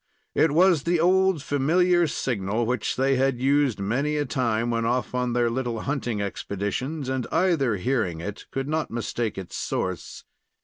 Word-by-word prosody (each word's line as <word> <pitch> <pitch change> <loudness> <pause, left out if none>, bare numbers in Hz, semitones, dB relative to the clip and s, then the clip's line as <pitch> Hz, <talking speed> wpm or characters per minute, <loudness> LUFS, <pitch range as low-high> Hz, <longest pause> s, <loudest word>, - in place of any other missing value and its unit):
It - - +4
was 175 0 +4
the 170 +3 +1
old 185 -2 +3
familiar 175 +5 +3
signal 115 -5 -1
which 125 -1 -1
they 135 +1 +2
had 135 -1 +1
used 135 -3 +2
many 135 +10 0
a 145 - 0
time 120 -3 0
when 115 0 0
off 120 +3 -1
on 125 -1 0
their 120 -1 +2
little 120 -2 -2
hunting 125 -6 -2
expeditions, 105 +9 -3
and 130 -2 -2
either, 160 - +2
hearing 95 -5 -1
it, 100 +5 -7
could 135 0 -3
not 155 +1 -1
mistake 115 0 -3
its 95 -2 -7
source. 95 -1 -3
130 Hz, 165 wpm, -25 LUFS, 115-150 Hz, -, It